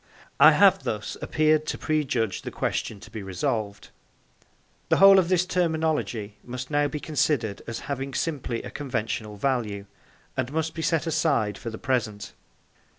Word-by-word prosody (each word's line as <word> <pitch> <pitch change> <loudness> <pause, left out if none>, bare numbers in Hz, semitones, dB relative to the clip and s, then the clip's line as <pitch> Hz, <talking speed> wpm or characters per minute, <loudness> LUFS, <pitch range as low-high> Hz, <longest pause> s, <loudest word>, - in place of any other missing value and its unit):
I - - +9
have - - +5
thus - - -4
appeared 155 0 +2
to - - -2
prejudge 130 -10 -1
the - - -5
question 105 - -3
to - - -13
be 110 - -6
resolved. 100 +2 -3 1.0
The - - +4
whole 195 0 +8
of 175 -2 0
this 180 -1 +3
terminology 160 - -1
must 125 +2 -7
now 145 0 +2
be 150 - -4
considered 140 -8 0
as 115 -1 -5
having 135 -1 -4
simply 135 -8 -2
a - - -7
conventional 115 -6 -3
value, 105 -5 -1 0.5
and 130 0 -2
must 160 +1 -1
be 165 - -5
set 160 0 +1
aside 155 - +1
for 115 - -6
the 110 - -7
present. 115 -6 -2
130 Hz, 155 wpm, -26 LUFS, 110-155 Hz, 1.0 s, I